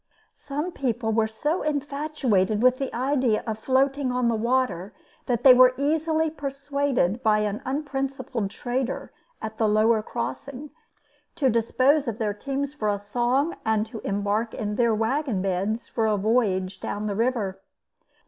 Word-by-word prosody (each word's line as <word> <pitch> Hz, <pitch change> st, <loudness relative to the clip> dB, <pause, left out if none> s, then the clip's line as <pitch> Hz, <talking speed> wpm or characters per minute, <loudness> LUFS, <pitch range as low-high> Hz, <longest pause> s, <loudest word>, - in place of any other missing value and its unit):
Some 295 Hz, +5 st, -4 dB
people 240 Hz, -7 st, -1 dB
were 220 Hz, 0 st, +2 dB
so 295 Hz, +10 st, -2 dB
infatuated 280 Hz, -8 st, 0 dB
with 255 Hz, 0 st, +4 dB
the 270 Hz, -, -2 dB
idea 255 Hz, -3 st, +1 dB
of 220 Hz, -2 st, -3 dB
floating 270 Hz, +2 st, +1 dB
on 250 Hz, -1 st, +1 dB
the 230 Hz, -, +1 dB
water 225 Hz, -5 st, 0 dB, 0.3 s
that 245 Hz, -2 st, 0 dB
they 260 Hz, -, +10 dB
were 255 Hz, 0 st, +6 dB
easily 315 Hz, +3 st, +1 dB
persuaded 275 Hz, -, -1 dB
by 215 Hz, -2 st, +3 dB
an 210 Hz, 0 st, -2 dB
unprincipled 270 Hz, -5 st, -3 dB
trader 245 Hz, +4 st, -3 dB, 0.3 s
at 220 Hz, 0 st, -6 dB
the 220 Hz, -, +3 dB
lower 215 Hz, +1 st, +3 dB
crossing 270 Hz, +5 st, -5 dB, 0.6 s
to 265 Hz, -4 st, +2 dB
dispose 255 Hz, +6 st, +2 dB
of 225 Hz, -2 st, -2 dB
their 215 Hz, -3 st, -1 dB
teams 275 Hz, +5 st, -3 dB
for 220 Hz, -8 st, -3 dB
a 205 Hz, -, +1 dB
song 245 Hz, +9 st, 0 dB
and 220 Hz, -1 st, +1 dB
to 225 Hz, -, -8 dB
embark 205 Hz, +3 st, -1 dB
in 210 Hz, -1 st, -3 dB
their 235 Hz, -1 st, +2 dB
wagon 230 Hz, 0 st, 0 dB
beds 195 Hz, +5 st, -1 dB
for 225 Hz, -2 st, 0 dB
a 210 Hz, -1 st, +2 dB
voyage 195 Hz, -4 st, +1 dB
down 205 Hz, +1 st, -4 dB
the 205 Hz, -, -1 dB
river. 215 Hz, -5 st, -1 dB
240 Hz, 155 wpm, -25 LUFS, 215-275 Hz, 0.6 s, they